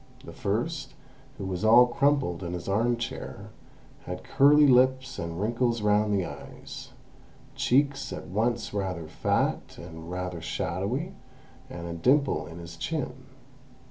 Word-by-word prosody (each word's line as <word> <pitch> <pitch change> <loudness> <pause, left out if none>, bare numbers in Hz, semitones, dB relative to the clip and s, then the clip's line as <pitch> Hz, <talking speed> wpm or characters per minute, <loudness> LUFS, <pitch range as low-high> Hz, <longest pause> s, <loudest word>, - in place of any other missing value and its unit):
The - - -9
first, 130 +10 -2 0.4
who 100 - -5
was 95 0 -3
all 115 +3 +8
crumpled 135 - +1
in 85 -1 -4
his 90 -1 -5
arm 115 +5 +2
chair, 120 - -6 0.5
had 90 0 -6
curly 145 +2 +6
lips 130 0 +3
and 85 0 -4
wrinkles 115 +1 0
round 105 0 +3
the 100 -3 +1
eyes, - - -9 0.6
cheeks 140 +1 +1
at - - -6
once 115 +5 -1
rather 95 -5 -3
fat - - -1
and 80 -1 -9
rather 90 -1 -4
shadowy, 100 - -2 0.6
and 85 0 -7
a 85 - -4
dimple 130 - +2
in 80 +2 -9
his 85 0 -9
chin. - - -2
105 Hz, 140 wpm, -27 LUFS, 90-130 Hz, 0.6 s, all